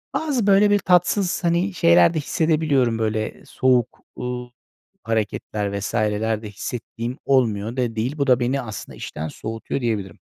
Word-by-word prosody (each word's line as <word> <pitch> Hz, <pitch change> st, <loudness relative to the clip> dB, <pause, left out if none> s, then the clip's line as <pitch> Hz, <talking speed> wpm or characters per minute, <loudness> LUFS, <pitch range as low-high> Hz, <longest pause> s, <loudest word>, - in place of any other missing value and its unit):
Bazı 275 Hz, -9 st, 0 dB
böyle 200 Hz, +1 st, +5 dB
bir 205 Hz, -, +4 dB
tatsız, 180 Hz, 0 st, +2 dB
hani, 175 Hz, +4 st, +1 dB
şeyler 85 Hz, -, +5 dB
de -, -, -2 dB
hissedebiliyorum 145 Hz, -7 st, +1 dB
böyle 110 Hz, 0 st, -2 dB
soğuk, 125 Hz, -2 st, +1 dB, 0.2 s
ııı, 125 Hz, 0 st, -4 dB, 0.5 s
hareketler 105 Hz, -2 st, -2 dB
vs.ler 110 Hz, +1 st, -1 dB
de 105 Hz, -, -7 dB
hissettiğim 115 Hz, +3 st, -5 dB
olmuyor 115 Hz, -3 st, +1 dB
da 120 Hz, -3 st, -1 dB
değil. 125 Hz, +7 st, -2 dB
Bu 140 Hz, -1 st, 0 dB
da 125 Hz, -1 st, +5 dB
beni 130 Hz, +3 st, 0 dB
aslında 110 Hz, -5 st, -8 dB
işten 80 Hz, +1 st, -5 dB
soğutuyor 115 Hz, -, -5 dB
diyebilirim. 105 Hz, -7 st, -2 dB
120 Hz, 145 wpm, -22 LUFS, 110-155 Hz, 0.5 s, böyle